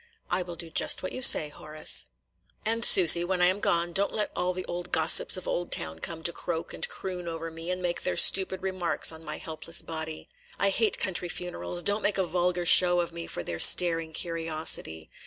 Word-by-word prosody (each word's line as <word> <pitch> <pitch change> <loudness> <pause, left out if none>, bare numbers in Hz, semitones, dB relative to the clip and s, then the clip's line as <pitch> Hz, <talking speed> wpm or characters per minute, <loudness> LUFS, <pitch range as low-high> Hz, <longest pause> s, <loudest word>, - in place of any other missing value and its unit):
"I 175 +1 -2
will 175 -1 -9
do 165 0 -11
just - - -1
what 185 - -6
you 255 - -8
say, 155 -11 +6
Horace." 155 +1 -1 0.6
"And, 230 +1 -3
Susy, 175 -5 +7
when 180 +1 -3
I 180 - +2
am 185 +3 -1
gone, 170 -2 -2
don't 200 +3 -2
let 210 - -4
all 180 0 -3
the 185 0 -7
old 175 0 -8
gossips 160 +3 +5
of 185 - -9
Oldtown 80 - -3
come 160 - -6
to 170 - 0
croak 170 -1 -6
and - - -3
croon 180 -2 -8
over 165 0 -8
me, 165 +2 -10
and 180 0 -5
make 175 -1 -4
their 180 - -4
stupid 190 -1 +3
remarks 185 -4 -2
on 160 0 -14
my - - -8
helpless 160 +1 -3
body. 160 -1 -8 0.3
I 200 0 -1
hate 220 +1 0
country 180 -2 -3
funerals. 175 0 -3
Don't 205 +4 0
make 205 -1 -2
a 190 - -2
vulgar 175 +1 -3
show 175 0 +5
of 175 0 -4
me 170 0 -9
for 85 - -7
their 85 0 -8
staring 165 -2 +6
curiosity. 160 - -3
175 Hz, 210 wpm, -25 LUFS, 165-185 Hz, 0.6 s, Susy